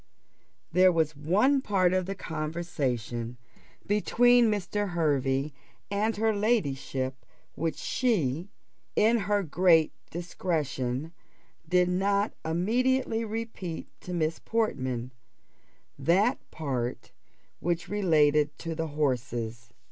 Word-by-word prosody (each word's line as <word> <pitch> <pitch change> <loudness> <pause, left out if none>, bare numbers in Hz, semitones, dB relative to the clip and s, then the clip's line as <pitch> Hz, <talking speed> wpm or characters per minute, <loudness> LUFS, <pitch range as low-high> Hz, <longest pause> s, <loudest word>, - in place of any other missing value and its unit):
There 185 +2 +6
was 160 -3 +1
one 205 - +3
part 185 -6 +2
of 185 -1 0
the 195 - -3
conversation 145 - -3 0.5
between 240 +3 +4
Mr. 205 0 -1
Hervey 140 -3 +1 0.4
and 210 +2 0
her 220 0 +2
ladyship 135 - -1 0.3
which 165 0 -2
she, 180 - 0 0.5
in 230 +2 +4
her 205 0 +1
great 165 -1 +4 0.2
discretion, 155 -5 -2 0.6
did 180 0 +4
not 200 +3 +1
immediately 230 +8 +1
repeat 220 -6 -5
to 180 - -8
Miss 160 -2 -1
Portman 130 - -1 0.9
that 200 +10 +3
part 130 -6 -3 0.5
which 170 0 -1
related 150 -7 +3
to 165 -1 -4
the 160 0 -2
horses. 120 -6 -2
170 Hz, 100 wpm, -28 LUFS, 145-205 Hz, 0.9 s, There